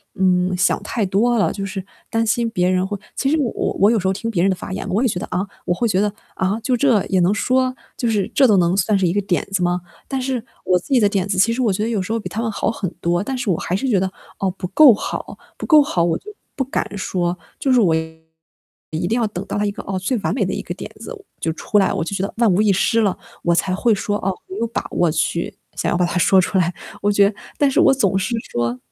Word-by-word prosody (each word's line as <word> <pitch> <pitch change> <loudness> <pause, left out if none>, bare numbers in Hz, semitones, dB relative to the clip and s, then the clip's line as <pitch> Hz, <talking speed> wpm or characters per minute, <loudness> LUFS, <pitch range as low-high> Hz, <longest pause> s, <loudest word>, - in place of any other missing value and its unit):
嗯， 185 -1 +2
想 180 - +2
太 220 - -1
多 225 +6 +2
了。 205 - +2
就 200 - -5
是 190 -1 -5 0.3
担 225 0 +1
心 230 +1 +1
别 180 -5 +1
人 185 0 +1
会 205 +1 -4 0.2
其 270 - 0
实 315 - +2
我 250 -5 0 0.3
我 200 +3 +5
有 230 - +2
时 190 - -1
候 190 - +2
听 215 +4 -4
别 180 -6 0
人 195 - +4
的 190 - +1
发 180 - -8
言， - - -4
我 200 +5 +1
也 - - +4
觉 185 -6 -2
得， - - -4
啊？ 185 +2 0 0.2
我 175 - +1
会 235 +6 0
觉 190 -4 +1
得， 210 0 +1 0.2
啊， 190 +3 0
就 250 +2 +1
这 240 -6 +3
也 190 - +1
能 175 +2 +3
说？ 255 +4 +1 0.2
就 240 - 0
是 205 -4 +1
这 270 - +5
都 215 - +4
能 175 0 +3
算 200 +1 +2
是 190 - +1
一 - - +1
个 205 - +1
点 190 -3 -1
子 195 -2 0
吗？ 175 0 +1 0.3
但 270 - -2
是 255 -3 -2 0.2
我 180 -1 +3
自 - - -16
己 255 - +6
的 210 - +4
点 195 -2 -1
子， 195 -1 -1
其 210 +5 +4
实 255 - -2
我 230 -4 +2
觉 210 - -1
得 225 - -1
有 220 -4 0
时 185 - -5
候 230 - 0
比 - - -6
他 220 - -3
们 230 - -1
好 215 - -1
很 195 -5 -3
多， 175 +1 +1
但 265 +4 -3
是 250 -4 -2
我 165 - +1
还 180 - -2
是 235 +8 -1
觉 205 -6 +3
得， 190 0 -1 0.3
哦， 195 - +1
不 180 0 -6
够 280 +7 +8
好， 205 - -5 0.2
不 - - -5
够 310 -2 +7
好 180 -11 0
我 170 -1 +1
就 420 - -11 0.2
不 270 - 0
敢 265 - -2
说。 180 -2 -1 0.2
就 270 - +1
是 250 - +5
我 175 -6 +3
一 160 +1 -7
定 225 - +1
要 230 - +2
等 200 -2 -6
到 - - -3
了 205 - +1
一 - - -1
个 - - -7
哦， 190 -1 -3
最 200 +7 -1
完 195 - -1
美 240 - +1
的 185 - -2
一 - - -3
个 - - -5
点 - - -8
子 - - -7 0.3
就 165 - -1
出 210 - -1
来， 195 - +2
我 - - -1
就 170 - -5
觉 190 - -2
得 200 - -3
万 230 -4 +4
无 185 +3 +3
一 215 -1 +4
失 230 +5 +2
了， 200 -4 +1 0.3
我 170 - +3
才 185 +2 0
会 230 +3 +2
说， 205 +1 -1
哦， 195 -1 -1
我 190 - -7
有 230 +2 0
把 230 - -3
握 175 - +2
去 165 +2 -1 0.2
想 - - 0
要 - - +1
把 180 - +2
它 175 - -2
说 190 +2 +5
出 190 - -1
来。 175 -1 +2 0.3
我 205 - +2
觉 200 -1 +5
得 - - -7 0.2
但 285 - +3
是 - - +2
我 - - +6
总 195 -8 +1
是 195 +5 -1 0.2
说， 120 +1 -1
195 Hz, 315 characters per minute, -20 LUFS, 180-230 Hz, 0.3 s, 够